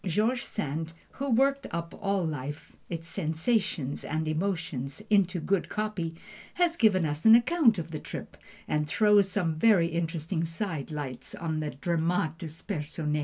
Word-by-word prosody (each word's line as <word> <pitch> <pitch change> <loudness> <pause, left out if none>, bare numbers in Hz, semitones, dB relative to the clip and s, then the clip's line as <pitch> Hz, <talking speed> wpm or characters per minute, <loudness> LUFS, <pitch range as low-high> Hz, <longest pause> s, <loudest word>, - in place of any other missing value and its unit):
George 215 +7 +1
Sand, 160 -3 -3 0.2
who 280 +1 -4
worked 275 +3 +3
up 170 0 -4
all 195 -3 +1
life, 145 -1 -5
its 165 -1 -5
sensations 160 - -1
and 155 +1 -2
emotions, 155 -2 -2
into 190 -3 +3
good 190 +3 0
copy, 205 -6 -2 0.4
has 345 -1 +2
given 205 - +4
us 150 0 -2
an 225 0 +9
account 240 - +4
of 165 -1 -5
the 155 - -4
trip, - - -7 0.3
that 150 0 0
throws 205 +3 +4
some 180 -4 0
very 190 -6 +5
interesting 165 0 -2
side 165 -3 -3
lights 135 -5 -5
on 160 -2 -2
the 155 -1 -2
dramatis 165 +1 -2
personæ. 150 0 -2
170 Hz, 150 wpm, -29 LUFS, 155-205 Hz, 0.4 s, an